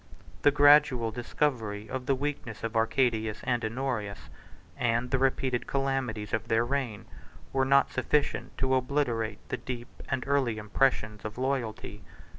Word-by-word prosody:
The - - +6
gradual 145 -5 +5
discovery 115 -3 -2
of 130 +1 -5
the 135 - +3
weakness 140 -5 -4
of 115 0 -3
Arcadius 110 -1 +1
and 120 -2 0
Honorius, 110 -3 -3 0.5
and 120 0 0
the 130 - +2
repeated 130 -2 0
calamities 135 -6 -2
of 110 - -1
their 115 +1 +2
reign, 120 -5 -2 0.5
were 135 0 +2
not 140 0 +4
sufficient 145 +3 0
to 130 0 +1
obliterate 125 -5 -1
the - - -2
deep 120 0 -6 0.2
and 130 -1 -1
early 135 -5 +1
impressions 105 -1 0
of 110 +1 -6
loyalty. 120 -5 -3
125 Hz, 140 wpm, -29 LUFS, 110-135 Hz, 0.5 s, The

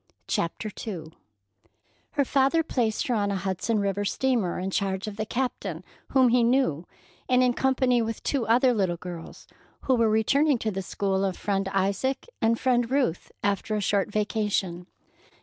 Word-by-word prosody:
CHAPTER 190 +6 -2 0.2
II 165 -6 -5 1.0
Her 285 -2 +2
father 275 +5 +3
placed 235 -8 0
her 250 - 0
on 205 -3 +1
a 200 - -1
Hudson 195 +4 -1
River 200 0 0
steamer 225 -3 0
in 185 +1 -3
charge 190 0 -1
of 210 - -5
the 215 0 -3
captain, 255 +2 -3 0.2
whom 260 -2 +4
he 245 +1 +4
knew, 235 - +1 0.4
and 255 0 +4
in 250 -1 +3
company 255 -2 +2
with 225 -1 -4
two 265 -6 -1
other 250 +3 +4
little 190 -6 0
girls, 175 -1 -9 0.4
who 265 - +1
were 230 -3 +3
returning 275 +7 +3
to 220 -1 -2
the 195 -1 -3
school 195 0 -1
of 190 -2 -1
Friend 195 -1 -1
Isaac 200 - 0
and 225 0 +2
Friend 245 -2 +2
Ruth 260 - 0
after 205 +2 0
a - - 0
short 200 0 0
vacation. 205 -4 -1
215 Hz, 165 wpm, -26 LUFS, 195-250 Hz, 1.0 s, whom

